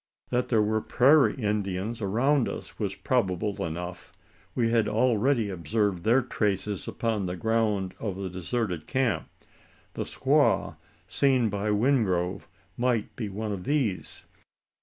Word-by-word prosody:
That 125 +1 0
there 110 -3 +3
were 110 +1 +1
prairie 140 +6 +4
Indians 105 -1 -2
around 120 +7 +2
us, - - -8
was 100 -3 -2
probable 105 -5 -1
enough. 90 +2 -6 0.4
We 115 -2 +1
had 115 -2 +3
already 115 -1 +2
observed 95 0 -1
their 120 +4 +4
traces 105 -4 -2
upon 110 -5 -1
the 90 - -3
ground 105 -2 0
of 100 -4 -3
the 95 0 -4
deserted 90 -1 -3
camp. 130 -3 0 0.6
The - - -3
"squaw" - - +2 0.3
seen 130 -5 +2
by 100 +1 -2
Wingrove 105 -6 +1 0.3
might 120 -3 0
be 110 -4 -4
one 105 +2 -4
of 95 -3 -4
these. 135 -10 -1
105 Hz, 135 wpm, -27 LUFS, 95-120 Hz, 0.6 s, prairie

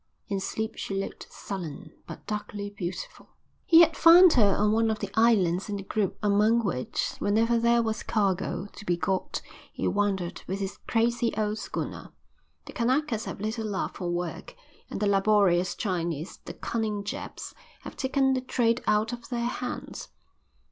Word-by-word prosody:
In 200 -1 -1
sleep 220 +3 -3
she 195 - -4
looked 195 0 -5
sullen, 175 -3 -7 0.2
but - - -9
darkly 205 -1 -4
beautiful. 185 -2 -6 0.4
He 330 0 +8
had 325 -2 +5
found 340 +2 +8
her 205 -6 +4
on 210 +1 +3
one 225 +1 +2
of 220 - 0
the 205 -2 -5
islands 200 -5 +3
in 205 - -2
the 200 - -5
group 200 0 -1
among 210 +3 +3
which, 125 -9 -2
whenever 225 +3 +2
there 235 0 +3
was 220 -1 -2
cargo 190 -3 0
to - - -10
be 175 -4 0
got, 190 +2 -2 0.3
he - - -2
wandered 195 -4 -1
with 190 +2 -3
his 195 -1 -4
crazy 235 0 +1
old 215 0 -1
schooner. - - -5 0.5
The - - -10
Kanakas 250 -1 0
have - - -6
little 220 +1 -2
love 200 -2 -2
for 180 -2 -4
work, 175 0 -4 0.3
and - - -5
the 210 - +1
laborious 195 -3 +3
Chinese, 170 -4 -3
the - - -6
cunning 215 -3 -2
Japs, 205 - -6 0.3
have - - -9
taken 265 0 +1
the 260 - 0
trade 240 -1 +1
out 215 +3 +2
of 240 -1 -8
their 235 -2 -1
hands. 250 +1 -5
210 Hz, 170 wpm, -27 LUFS, 195-235 Hz, 0.5 s, He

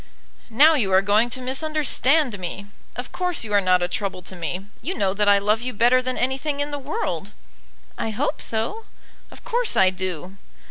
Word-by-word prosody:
"Now 290 +8 +6
you 225 -11 +1
are 190 +1 +5
going 210 +4 +3
to 255 - -2
misunderstand 280 -2 +1
me! 185 +3 -5 0.3
Of 245 0 -6
course, 360 -5 -2
you 210 -2 -5
are 205 - +5
not 185 -1 +3
a - - +1
trouble 190 0 -4
to 185 - -9
me. 175 +3 -4 0.2
You 355 +9 -3
know 195 -3 +1
that 205 0 +2
I 200 - +6
love 210 +3 +1
you 250 +1 -3
better 240 +4 +4
than 255 0 -3
anything 270 +3 -1
in 290 +1 -1
the 290 - -3
world." 295 +12 -3 0.7
"I - - -1
hope 215 - -2
so." 230 - -2 0.4
"Of - - -15
course 480 0 0
I 185 -1 +5
do." 185 0 -5
225 Hz, 195 wpm, -23 LUFS, 195-285 Hz, 0.7 s, Now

